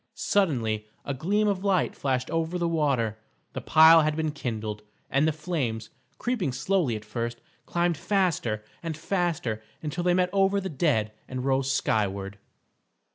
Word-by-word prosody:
Suddenly 115 - 0 0.2
a 140 - -2
gleam 200 +10 +1
of 195 -2 0
light 195 -4 +1
flashed 130 -2 -1
over 165 +2 -1
the 170 -1 0
water; 135 -10 0 0.3
the - - -4
pile 160 +1 +7
had 155 0 +1
been 155 -1 -1
kindled, 110 -7 -4 0.3
and 140 +3 +3
the - - +3
flames, 145 -9 -3 0.3
creeping 230 - -1
slowly 140 - 0
at 105 0 -7
first, 115 +2 -4 0.3
climbed 175 -1 +1
faster 170 - 0 0.2
and 165 -3 -4
faster 165 - -1 0.2
until 160 +3 -3
they 175 0 +3
met 180 0 +2
over 195 0 +3
the 190 -1 -4
dead 130 -8 +1 0.2
and 130 0 -4
rose 135 0 +1
skyward. 100 -5 -1
150 Hz, 155 wpm, -27 LUFS, 115-175 Hz, 0.3 s, pile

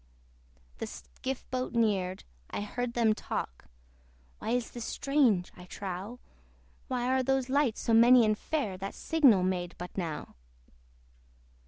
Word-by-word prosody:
The - - -3
skiff 65 - -6
boat 255 -1 -2
neared: 195 -5 +1 0.3
I - - -3
heard 235 +3 -3
them 225 -2 +4
talk, 60 - -5 0.7
"Why 235 - -1
this 245 -1 -3
is 240 - -4
strange, 250 -10 +2
I 180 - -12
trow! 195 +5 -6 0.7
Where 255 0 0
are - - +2
those 265 0 0
lights 275 -4 +1
so 230 - +1
many 235 +1 +7
and 215 0 +3
fair, 215 -6 -2
That 195 +1 -5
signal 270 - +4
made 180 -1 -1
but 180 0 -8
now?" 165 -5 -4
225 Hz, 140 wpm, -30 LUFS, 185-255 Hz, 0.7 s, many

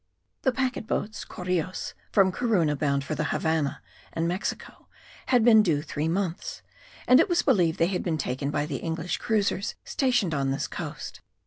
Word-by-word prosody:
The 260 - +2
packet 255 -3 -2
boats 210 -2 -2
(correos) 180 0 -3 0.2
from 190 -2 +4
Corunna 180 -9 +1
bound 140 -1 0
for 155 - -4
the 150 - -1
Havannah 160 -3 -1 0.3
and 165 0 -1
Mexico 180 +3 -4 0.4
had 245 -3 +4
been 220 -3 +8
due 155 -8 +1
three 155 0 -2
months; 175 0 -2 0.4
and 255 +2 +7
it 330 - +3
was 350 0 +2
believed 180 - +3
they 165 - +3
had 180 +1 -1
been 165 -3 -1
taken 135 0 -2
by 145 0 0
the 145 -3 -3
English 165 +3 -3
cruisers 205 -2 0
stationed 245 - +1
on 135 -2 0
this 135 - -1
coast. - - -7
180 Hz, 175 wpm, -27 LUFS, 155-215 Hz, 0.4 s, been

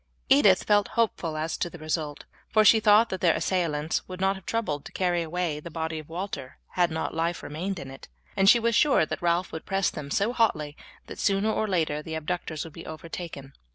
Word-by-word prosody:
Edith 185 +6 +6
felt 205 -2 +3
hopeful 180 -8 0
as 160 +1 -2
to 175 - -2
the 175 - -10
result, 155 -1 -3 0.2
for 215 0 +4
she 220 +2 +7
thought 215 +2 +5
that 190 - -4
their 170 -3 +4
assailants 160 -4 -1
would 185 0 -8
not 190 +1 +2
have 190 - -13
troubled 155 -11 -2
to - - -9
carry 175 -2 0
away 165 -2 -2
the 160 - -9
body 160 0 -3
of 155 - -12
Walter 170 -6 -6
had 175 -1 +1
not 160 0 -3
life 165 +1 -1
remained 180 +6 -4
in 135 -4 -7
it, 135 - -12 0.3
and 195 0 +5
she 240 - +8
was 230 0 +1
sure 270 - +4
that - - -5
Ralph 175 +1 +1
would 160 - -6
press 195 -1 +1
them 145 -2 -7
so 200 +10 +1
hotly 155 -12 +1 0.3
that - - -10
sooner 200 +1 +2
or 220 - 0
later 160 -6 0
the 160 +1 -6
abductors 160 -1 -3
would 165 - -10
be 165 - -10
overtaken. 160 -3 -8
170 Hz, 220 wpm, -27 LUFS, 155-195 Hz, 0.3 s, she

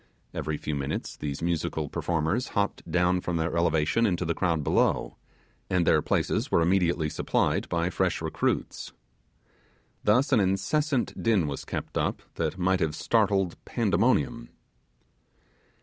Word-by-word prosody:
Every 75 -1 -3
few 75 - -4
minutes 70 -2 -3
these 75 +1 -5
musical 85 -2 -1
performers 85 - -1
hopped 100 0 -1
down 90 +1 +2
from 90 -1 -2
their 80 +1 -1
elevation 85 +6 +2
into 90 -2 -1
the 85 - 0
crowd 80 -3 0
below, - - +1 0.5
and 90 -2 +2
their - - +4
places - - 0
were - - +3
immediately 85 -2 +2
supplied - - 0
by 85 +1 0
fresh - - 0
recruits. - - -2 1.1
Thus 125 +8 +3
an 125 - +5
incessant 120 +8 0
din 110 -7 +3
was 70 -2 -5
kept - - -4
up - - -1
that 80 +2 -2
might 95 0 +2
have 80 -3 0
startled 100 -3 +1
Pandemonium. 115 +2 +1
90 Hz, 135 wpm, -27 LUFS, 80-105 Hz, 1.1 s, an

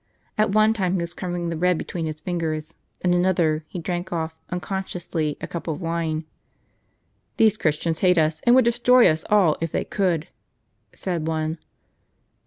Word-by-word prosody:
At 215 -1 +2
one 215 +1 +4
time 190 -4 0
he 180 - 0
was 170 0 -3
crumbling 175 -2 -3
the 165 - -2
bread 180 +1 +2
between 165 -1 -4
his 155 0 -5
fingers; 160 -4 -3 0.3
at 180 - +3
another, 175 -4 +2
he - - -8
drank 175 +2 -3
off, 160 -2 -2 0.2
unconsciously, 180 -4 -3
a - - -4
cup 170 - -6
of 160 -1 -2
wine. 165 -2 -2 0.6
" - - -45
These 220 -2 +5
Christians 160 +1 0
hate 180 -2 +4
us, 155 0 +2
and 240 0 +6
would 260 -2 +5
destroy 240 +1 +5
us 160 -1 +1
all 195 -7 +4
if 165 -1 -2
they - - 0
could," 175 -5 0 0.6
said 170 -4 -3
one. 160 0 -2
175 Hz, 175 wpm, -23 LUFS, 160-185 Hz, 0.6 s, and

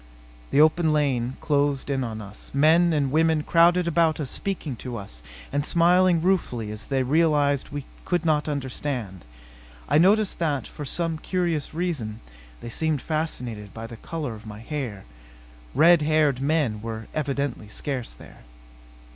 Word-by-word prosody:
The - - +2
open 160 +1 +4
lane 135 -4 0
closed 145 -2 +1
in 135 -2 -1
on 110 -2 -5
us. 100 0 -8
Men 165 +4 +5
and 145 -4 +1
women 160 0 +2
crowded 175 +2 +4
about 165 -1 +2
us 140 -4 -3
speaking 175 -9 -3
to 125 -1 -6
us - - -8 0.3
and 145 +1 0
smiling 175 +1 +4
ruefully 125 - 0
as 105 0 -6
they 135 -2 +1
realized 145 -1 +2
we 145 -2 -6 0.2
could 175 -2 -1
not 155 -2 +2
understand. 130 - -4 0.6
I 145 +3 +4
noticed 205 +4 +3
that, 145 -7 0
for 150 - -8
some 165 +2 -1
curious 170 -4 -2
reason, 145 -12 -3 0.4
they - - -7
seemed 155 +4 -1
fascinated 125 -10 -4
by 115 0 -6
the 115 - -9
color 150 -2 -5
of 110 0 -11
my 105 -1 -8
hair. 120 -7 -5 0.7
Red 170 0 +6
haired 150 -3 +2
men 140 -7 0
were 110 0 -5
evidently 140 -6 -2
scarce 125 - -4
there. - - -15
145 Hz, 155 wpm, -25 LUFS, 125-160 Hz, 0.7 s, Red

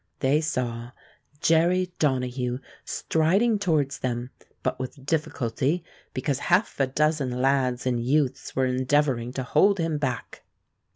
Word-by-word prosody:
They 145 +3 +3
saw 120 -5 -3 0.5
Jerry 175 +3 +3
Donahue 125 -3 0 0.3
striding 195 +8 +1
towards 155 -8 +1
them, 125 0 -3 0.3
but - - -1
with 130 +1 -6
difficulty, 150 0 -1 0.3
because 135 +1 -1
half 175 +5 +1
a 135 - +3
dozen 140 -2 0
lads 130 -2 +1
and 120 -2 0
youths 135 +1 0
were 130 - +2
endeavoring 130 -1 +1
to 130 - -3
hold 200 +10 +3
him 165 -3 -1
back. 130 -5 -3
135 Hz, 125 wpm, -26 LUFS, 125-160 Hz, 0.5 s, They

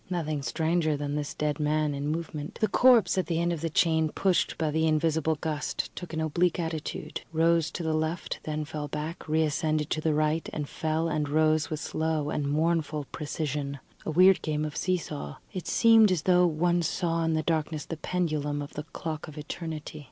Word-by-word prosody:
Nothing 155 -5 -2
stranger 160 +1 0
than 145 0 -3
this 145 -1 -3
dead 150 0 -1
man 150 0 +1
in 140 +1 -3
movement. 155 -1 -4
The 215 - +3
corpse 245 -6 +5
at 185 - -1
the 165 -2 0
end 170 0 +1
of 160 - -5
the 165 - -1
chain, 160 -1 +2
pushed 185 +3 +1
by 155 -2 0
the 160 +1 +2
invisible 160 0 +2
gust, 150 -1 -3
took 180 - -7
an 160 - -3
oblique 170 +3 +1
attitude; 160 -2 -4
rose 165 0 +3
to 175 - -5
the 160 -1 0
left, 160 +2 -2
then 155 0 -3
fell 150 0 -5
back, 150 +4 -5
reascended 155 -1 +1
to 155 - 0
the 155 -1 +1
right, 155 +1 +1
and 150 -2 -3
fell 160 +2 -1
and 150 -2 -1
rose 155 +1 +2
with 155 -1 -3
slow 155 -1 -1
and 145 -2 -1
mournful 155 -1 0
precision. 145 -2 -3 0.3
A - - -4
weird 180 +2 +6
game 150 0 -1
of 150 - -5
see 185 0 +1
saw. 70 - -6 0.2
It 185 - -5
seemed 225 -3 +6
as 170 -4 0
though 180 -1 +5
one 175 +2 +1
saw 165 0 0
in 165 0 +1
the 155 - 0
darkness 155 -2 -1
the 165 - -5
pendulum 155 -4 -1
of 145 - -10
the 150 - -5
clock 155 -2 -4
of 155 -1 -11
Eternity. 155 0 -6
155 Hz, 200 wpm, -28 LUFS, 150-165 Hz, 0.3 s, weird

